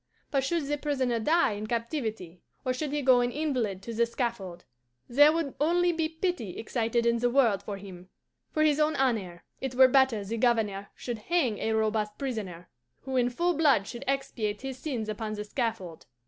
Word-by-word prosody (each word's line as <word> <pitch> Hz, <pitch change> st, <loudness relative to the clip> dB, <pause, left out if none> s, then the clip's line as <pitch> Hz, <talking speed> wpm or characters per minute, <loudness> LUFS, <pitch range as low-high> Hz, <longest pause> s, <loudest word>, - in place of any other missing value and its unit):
But 275 Hz, -3 st, +1 dB
should 325 Hz, +2 st, 0 dB
the 295 Hz, +1 st, -2 dB
prisoner 260 Hz, -5 st, 0 dB
die 315 Hz, +5 st, +3 dB
in 210 Hz, +1 st, -5 dB
captivity, 225 Hz, -, -3 dB, 0.2 s
or 255 Hz, -, +1 dB
should 285 Hz, +2 st, -3 dB
he 295 Hz, -1 st, -1 dB
go 255 Hz, -1 st, +6 dB
an 245 Hz, -, +1 dB
invalid 245 Hz, -10 st, -2 dB
to 235 Hz, -, -6 dB
the 235 Hz, +1 st, +2 dB
scaffold, 230 Hz, -8 st, -4 dB, 0.4 s
there 290 Hz, +5 st, +6 dB
would 320 Hz, -4 st, -2 dB
only 350 Hz, +3 st, +3 dB
be 320 Hz, -2 st, -1 dB
pity 320 Hz, -, -3 dB
excited 230 Hz, +1 st, -1 dB
in 235 Hz, 0 st, +2 dB
the 245 Hz, +1 st, +2 dB
world 240 Hz, -6 st, +3 dB
for 205 Hz, -2 st, -6 dB
him. 185 Hz, -2 st, -11 dB, 0.4 s
For 310 Hz, -, +1 dB
his 305 Hz, -1 st, +3 dB
own 305 Hz, +1 st, +2 dB
honour, 210 Hz, -10 st, -1 dB, 0.2 s
it 265 Hz, -2 st, -4 dB
were 260 Hz, 0 st, +8 dB
better 260 Hz, -5 st, +3 dB
the 225 Hz, +4 st, -3 dB
Governor 215 Hz, -4 st, +1 dB
should 240 Hz, -3 st, -5 dB
hang 285 Hz, -12 st, +1 dB
a 220 Hz, -, 0 dB
robust 215 Hz, -1 st, 0 dB
prisoner, 205 Hz, -10 st, -5 dB, 0.3 s
who 265 Hz, 0 st, -5 dB
in 245 Hz, -1 st, +3 dB
full 345 Hz, +8 st, 0 dB
blood 285 Hz, -, +3 dB
should 240 Hz, +1 st, -7 dB
expiate 240 Hz, -6 st, -2 dB
his 265 Hz, -1 st, -5 dB
sins 250 Hz, -7 st, -3 dB
upon 215 Hz, 0 st, -4 dB
the 210 Hz, 0 st, -4 dB
scaffold. 210 Hz, -, -4 dB
240 Hz, 190 wpm, -28 LUFS, 215-280 Hz, 0.4 s, were